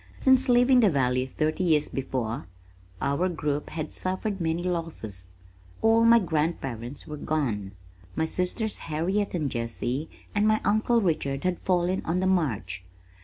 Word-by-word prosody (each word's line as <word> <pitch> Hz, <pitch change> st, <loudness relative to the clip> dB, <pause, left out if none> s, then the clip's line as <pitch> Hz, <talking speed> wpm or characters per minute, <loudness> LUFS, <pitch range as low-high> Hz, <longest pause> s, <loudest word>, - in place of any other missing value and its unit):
Since 260 Hz, 0 st, +4 dB
leaving 245 Hz, +1 st, +5 dB
the 220 Hz, -4 st, +5 dB
valley 130 Hz, -4 st, +1 dB
thirty 155 Hz, +6 st, -1 dB
years 155 Hz, -4 st, +3 dB
before 120 Hz, -8 st, -3 dB, 0.6 s
our 165 Hz, +7 st, +1 dB
group 150 Hz, -4 st, -2 dB
had 155 Hz, -1 st, -5 dB
suffered 190 Hz, +1 st, -2 dB
many 165 Hz, +1 st, 0 dB
losses. 155 Hz, -, -2 dB, 0.5 s
All 225 Hz, +1 st, +5 dB
my 230 Hz, 0 st, +8 dB
grandparents 150 Hz, -, -2 dB
were 150 Hz, -, -7 dB
gone. 115 Hz, -11 st, -2 dB, 0.4 s
My 160 Hz, -, +1 dB
sisters 185 Hz, +6 st, -2 dB
Harriet 185 Hz, +6 st, 0 dB
and 150 Hz, -6 st, -1 dB
Jessie 120 Hz, +5 st, -3 dB, 0.2 s
and 210 Hz, +1 st, +2 dB
my 215 Hz, 0 st, +3 dB
uncle 225 Hz, +2 st, +3 dB
Richard 140 Hz, -7 st, -1 dB
had 180 Hz, -1 st, 0 dB
fallen 180 Hz, 0 st, +1 dB
on 170 Hz, +3 st, 0 dB
the 190 Hz, -, 0 dB
march. 155 Hz, -, 0 dB
165 Hz, 145 wpm, -27 LUFS, 135-190 Hz, 0.6 s, my